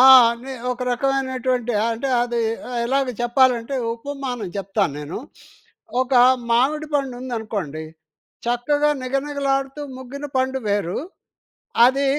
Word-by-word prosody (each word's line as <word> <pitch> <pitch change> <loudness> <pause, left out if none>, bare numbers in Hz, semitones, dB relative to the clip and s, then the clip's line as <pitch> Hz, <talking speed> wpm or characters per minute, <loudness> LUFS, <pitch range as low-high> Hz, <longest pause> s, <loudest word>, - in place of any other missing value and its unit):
ఆ! - - +8 0.3
అనే, 245 +3 -8 0.2
ఒక 250 0 -3
రకమైనటువంటి 255 -2 0 0.2
అంటే 230 +4 -2
అది 240 -1 -1 0.5
ఎలాగ 270 +2 +1 0.2
చెప్పాలంటే 245 0 +3 0.2
ఉపమానం 250 -4 -5
చెప్తానేను. 180 -6 -2 0.8
ఒక 260 +1 0 0.4
మామిడి 280 +6 +2
పండు 275 -3 0
ఉందనుకోండి, 215 - -4 0.6
చక్కగా 290 +5 +2
నిగనిగలాడుతూ 275 +1 -1 0.2
ముగ్గిన 265 +3 -7
పండు 260 0 +1
వేరు. 200 -4 0 0.9
అది 270 +2 +2
255 Hz, 100 wpm, -22 LUFS, 235-275 Hz, 0.9 s, ఆ